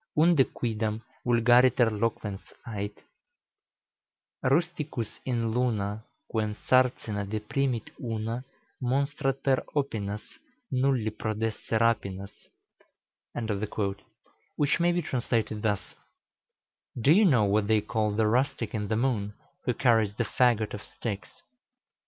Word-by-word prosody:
Unde 170 Hz, -6 st, +6 dB
quidam 110 Hz, -2 st, -1 dB, 0.3 s
vulgariter 120 Hz, 0 st, +5 dB
loquens 105 Hz, -2 st, -2 dB, 0.3 s
ait: 105 Hz, -2 st, -4 dB, 1.4 s
"Rusticus 150 Hz, -5 st, -1 dB
in 115 Hz, -3 st, 0 dB
Luna, 110 Hz, -3 st, 0 dB, 0.2 s
Quem 110 Hz, -2 st, -1 dB
sarcina 125 Hz, -5 st, +2 dB
deprimit 115 Hz, +4 st, -2 dB
una 115 Hz, -1 st, -2 dB, 0.5 s
Monstrat 135 Hz, 0 st, 0 dB
per 135 Hz, -2 st, +3 dB, 0.2 s
opinas 105 Hz, -8 st, -2 dB, 0.5 s
Nulli 130 Hz, -4 st, +2 dB
prodesse 110 Hz, +1 st, -2 dB
rapinas," 100 Hz, -4 st, 0 dB, 2.2 s
which 145 Hz, +4 st, +2 dB
may 175 Hz, +1 st, +4 dB
be 175 Hz, 0 st, 0 dB
translated 115 Hz, -5 st, -1 dB
thus: 105 Hz, -3 st, -1 dB, 1.1 s
"Do 130 Hz, +6 st, +4 dB
you 205 Hz, +6 st, +6 dB
know 130 Hz, -, +5 dB
what 100 Hz, +1 st, +2 dB
they 110 Hz, -1 st, +3 dB
call 105 Hz, 0 st, 0 dB
the 110 Hz, 0 st, +2 dB
rustic 120 Hz, 0 st, +1 dB
in 105 Hz, -2 st, -2 dB
the 110 Hz, -, 0 dB
moon, 110 Hz, -5 st, 0 dB, 0.3 s
who 125 Hz, -, +1 dB
carries 115 Hz, -5 st, +3 dB
the 115 Hz, -, 0 dB
fagot 115 Hz, -3 st, +2 dB
of 105 Hz, -, -5 dB
sticks?" 100 Hz, -5 st, -7 dB
115 Hz, 110 wpm, -28 LUFS, 105-130 Hz, 2.2 s, Unde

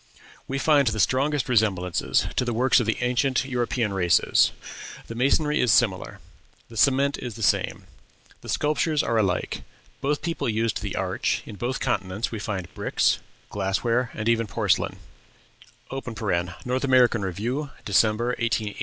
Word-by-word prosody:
We 135 Hz, -, -2 dB
find 145 Hz, -1 st, +3 dB
the 110 Hz, -1 st, 0 dB
strongest 140 Hz, +4 st, +1 dB
resemblances 100 Hz, -7 st, +1 dB
to -, -, +1 dB
the 120 Hz, -2 st, -2 dB
works 130 Hz, +3 st, +4 dB
of 120 Hz, -, -1 dB
the 110 Hz, -, +1 dB
ancient 125 Hz, +2 st, +1 dB
European 120 Hz, -4 st, -1 dB
races: 90 Hz, -3 st, +3 dB, 0.5 s
the -, -, -7 dB
masonry 150 Hz, +5 st, +2 dB
is 125 Hz, -, +3 dB
similar; 115 Hz, -5 st, +1 dB, 0.5 s
the 115 Hz, -, -12 dB
cement 140 Hz, +4 st, +3 dB
is 120 Hz, -4 st, -6 dB
the 115 Hz, -, -6 dB
same; -, -, +1 dB, 0.6 s
the -, -, -10 dB
sculptures 150 Hz, +1 st, +1 dB
are 115 Hz, -1 st, +1 dB
alike; 95 Hz, -4 st, -1 dB, 0.4 s
both 145 Hz, +1 st, -1 dB
peoples 145 Hz, -8 st, -2 dB
used 110 Hz, -1 st, -1 dB
the -, -, -4 dB
arch; -, -, -1 dB
in 105 Hz, -, -9 dB
both 120 Hz, +6 st, -3 dB
continents 100 Hz, -3 st, -2 dB
we 115 Hz, -, -4 dB
find 95 Hz, -4 st, -5 dB
bricks, -, -, +1 dB, 0.3 s
glassware, 115 Hz, +5 st, 0 dB
and 105 Hz, 0 st, -3 dB
even 115 Hz, -1 st, +2 dB
porcelain -, -, 0 dB, 1.7 s
(North 125 Hz, +2 st, -1 dB
American 125 Hz, -4 st, +4 dB
Review, 115 Hz, -, -3 dB, 0.2 s
December, 110 Hz, +3 st, +2 dB
1880, 110 Hz, -3 st, -1 dB
pp. -, -, -16 dB
120 Hz, 150 wpm, -25 LUFS, 105-130 Hz, 1.7 s, works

